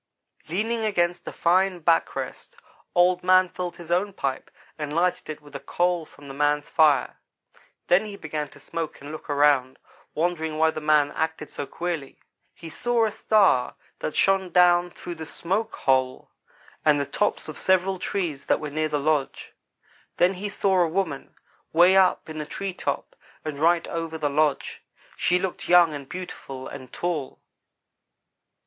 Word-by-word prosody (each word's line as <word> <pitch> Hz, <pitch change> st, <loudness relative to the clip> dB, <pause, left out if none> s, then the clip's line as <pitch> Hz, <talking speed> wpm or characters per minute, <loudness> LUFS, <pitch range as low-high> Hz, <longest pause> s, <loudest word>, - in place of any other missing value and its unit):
"Leaning 225 Hz, +6 st, -1 dB
against 175 Hz, -4 st, 0 dB
a -, -, -3 dB
fine 185 Hz, +2 st, +2 dB
back 165 Hz, 0 st, +2 dB
rest, -, -, -6 dB, 0.4 s
Old 180 Hz, 0 st, +4 dB
man 185 Hz, 0 st, +5 dB
filled 180 Hz, 0 st, -5 dB
his 170 Hz, -1 st, -9 dB
own 190 Hz, +3 st, +1 dB
pipe 135 Hz, -6 st, -3 dB, 0.3 s
and 150 Hz, -2 st, -5 dB
lighted 175 Hz, 0 st, 0 dB
it 155 Hz, 0 st, -6 dB
with 145 Hz, -1 st, -15 dB
a -, -, -4 dB
coal 175 Hz, -2 st, -1 dB
from 145 Hz, -, -17 dB
the 135 Hz, -, -8 dB
man's 145 Hz, +1 st, +1 dB
fire. 150 Hz, -4 st, +3 dB, 0.7 s
Then 185 Hz, +5 st, +3 dB
he 205 Hz, -2 st, -7 dB
began 155 Hz, -4 st, -4 dB
to -, -, -17 dB
smoke 165 Hz, -2 st, -5 dB
and 145 Hz, +1 st, -9 dB
look 155 Hz, -, -9 dB
around, 140 Hz, -3 st, +3 dB, 0.4 s
wondering 160 Hz, -1 st, -1 dB
why 160 Hz, 0 st, +3 dB
the 155 Hz, -, -6 dB
man 150 Hz, -1 st, +3 dB
acted 160 Hz, -1 st, -3 dB
so 145 Hz, -, -5 dB
queerly. 170 Hz, -6 st, -5 dB, 0.4 s
He 165 Hz, -, -10 dB
saw 235 Hz, +7 st, +1 dB
a 215 Hz, -, -1 dB
star 195 Hz, -, +3 dB, 0.2 s
that 155 Hz, -, -4 dB
shone 195 Hz, -1 st, +2 dB
down 175 Hz, 0 st, +4 dB
through 175 Hz, 0 st, -8 dB
the 160 Hz, -1 st, -8 dB
smoke 205 Hz, +8 st, -2 dB
hole, 130 Hz, -1 st, 0 dB, 0.5 s
and 150 Hz, -2 st, +4 dB
the 140 Hz, -, 0 dB
tops 205 Hz, +9 st, -1 dB
of -, -, -8 dB
several 190 Hz, 0 st, +2 dB
trees 175 Hz, -8 st, -3 dB
that -, -, +2 dB
were 150 Hz, -1 st, -5 dB
near 155 Hz, +1 st, -1 dB
the 150 Hz, -, 0 dB
lodge. 145 Hz, -1 st, -1 dB, 0.6 s
Then 180 Hz, +2 st, +4 dB
he 200 Hz, +2 st, -5 dB
saw 195 Hz, -2 st, +2 dB
a 170 Hz, -, +3 dB
woman 160 Hz, -5 st, -3 dB, 0.4 s
way 175 Hz, +3 st, +6 dB
up 190 Hz, -1 st, +3 dB
in 155 Hz, -1 st, -5 dB
a -, -, -5 dB
tree 195 Hz, +3 st, -4 dB
top -, -, -4 dB, 0.3 s
and 150 Hz, -2 st, -4 dB
right 170 Hz, +2 st, +3 dB
over 165 Hz, -1 st, -4 dB
the 150 Hz, -2 st, -1 dB
lodge. 145 Hz, -1 st, 0 dB, 0.3 s
She 180 Hz, -, +2 dB
looked 185 Hz, 0 st, -4 dB
young 175 Hz, -3 st, +6 dB
and 140 Hz, -2 st, -8 dB
beautiful 135 Hz, -7 st, -7 dB
and 130 Hz, -3 st, -10 dB
tall. 165 Hz, -6 st, -3 dB
165 Hz, 170 wpm, -25 LUFS, 150-180 Hz, 0.7 s, way